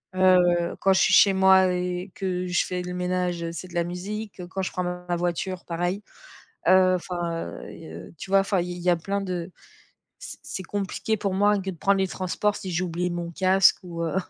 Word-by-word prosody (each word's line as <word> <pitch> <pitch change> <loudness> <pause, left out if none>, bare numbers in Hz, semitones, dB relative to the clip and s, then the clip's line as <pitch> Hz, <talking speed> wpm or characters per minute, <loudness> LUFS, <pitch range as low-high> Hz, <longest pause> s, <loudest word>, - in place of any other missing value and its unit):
Heu, 180 -2 +4
quand 195 - +4
je 190 - +3
suis - - +4
chez 200 - +7
moi 190 -1 +5
et 180 +1 -3
que 185 -2 -2
je 175 0 +1
fais 180 0 -3
le 180 0 -5
ménage, 180 -1 -1
c'est 175 +2 -7
de 175 - -12
la 170 - +2
musique. 190 +3 -6
Quand 190 - -3
je - - -3
prends 180 - -2
ma 180 0 -3
voiture 175 +1 -2
pareil. 175 +4 -2 0.7
Heu, 185 0 +6
enfin, 170 -2 -4 0.2
heu, - - -9
il 80 +1 -10
y - - -17
tu 190 - -9
vois, 195 0 +6
enfin 195 -1 +1
i 180 +1 -3
il 175 - -7
y 180 - -1
a 175 - +3
plein 200 +4 -2
de 180 -2 -4 0.7
c'est - - -9
c'est 190 - -6
compliqué 205 +4 -2
pour 200 -2 -2
moi 205 +1 +3
que 190 0 -3
de 175 - -9
prendre 195 +4 +2
les 190 0 +1
transports 195 +3 -1
si 190 - -6
j'oublie 175 0 -1
mon 175 -1 -4
casque 190 +2 +4
ou 170 -2 -6
heu, 165 - -2
180 Hz, 220 wpm, -25 LUFS, 175-190 Hz, 0.7 s, chez